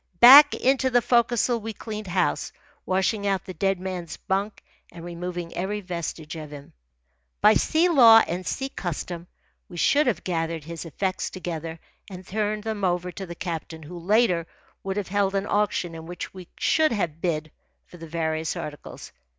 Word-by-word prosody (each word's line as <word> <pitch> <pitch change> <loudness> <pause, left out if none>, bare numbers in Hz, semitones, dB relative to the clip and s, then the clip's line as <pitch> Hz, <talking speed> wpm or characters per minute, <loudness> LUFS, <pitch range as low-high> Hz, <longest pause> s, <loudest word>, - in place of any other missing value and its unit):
Back 280 +4 +10
into 265 0 +2
the 245 -1 +4
forecastle 240 0 +2
we 225 0 -6
cleaned 215 -1 -7
house, 175 - 0 0.4
washing 195 +2 0
out 195 -1 0
the 185 - -7
dead 195 +2 0
man's 180 -3 -5
bunk 200 +2 -3 0.3
and 170 -1 -10
removing 175 0 -5
every 200 +4 -2
vestige 170 -4 -5
of 155 -2 -7
him. 145 -1 -11 0.7
By 210 - +6
sea 320 +9 +2
law 235 -9 +8
and 180 +2 -3
sea 270 +7 -3
custom, 175 - -5 0.4
we 175 - -10
should 290 - +3
have 240 - 0
gathered 165 -3 -2
his 165 +1 -7
effects 185 +4 -2
together 165 -3 -6 0.3
and 185 -1 -9
turned 210 +1 -2
them 220 -2 -4
over 180 0 0
to 190 +2 -7
the 170 - -7
captain, 165 -2 -6
who, 175 +4 -9
later, 180 -2 +2 0.4
would 195 0 -3
have 205 -3 -3
held 200 0 +1
an 195 0 0
auction 205 -5 0
in 160 0 -9
which 175 +1 -7
we 185 -2 -10
should 315 -2 +2
have 165 -8 -2
bid 155 -3 -2 0.3
for 175 - -14
the 165 -1 -10
various 160 -1 -2
articles. 150 -1 -8
185 Hz, 175 wpm, -25 LUFS, 170-210 Hz, 0.7 s, Back